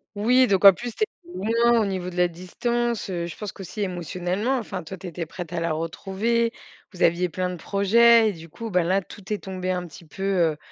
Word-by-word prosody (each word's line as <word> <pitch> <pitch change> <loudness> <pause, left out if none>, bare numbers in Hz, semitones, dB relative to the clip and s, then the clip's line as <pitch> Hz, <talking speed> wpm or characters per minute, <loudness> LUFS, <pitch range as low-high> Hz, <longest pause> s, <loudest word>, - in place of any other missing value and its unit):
Oui, 250 +5 +4
donc, 195 -1 +2
en 195 - +12
plus, 240 +3 -7
tu - - 0
étais - - +4 0.3
loin 230 +3 +3
au - - 0
niveau 185 -2 -3
de 180 - -10
la 180 0 +4
distance, 235 +6 -2
heu, 170 -1 -2
je 170 - -8
pense 210 -3 -5
qu'aussi 195 +2 -7
émotionnellement, 185 - -1
enfin, 200 -6 -5
toi, 190 +4 -8
tu 185 - -11
étais 170 -2 -5
prêt 175 +2 -6
à 175 - -2
la 165 -1 -1
retrouver. 195 +8 -1 0.4
Vous 185 - -3
aviez 175 +2 +3
plein 180 +2 -2
de 180 - -6
projets 225 +5 +5
et - - -3
du 165 -1 -12
coup, 225 +6 -7
bah, 180 -2 +3
là, 190 +3 +2
tout 205 +2 -12
est 210 - +1
tombé 185 -1 -4
un 180 -1 -1
petit 170 +1 -13
peu, 195 +5 -8
heu, 175 -6 +2
190 Hz, 235 wpm, -24 LUFS, 175-220 Hz, 0.4 s, en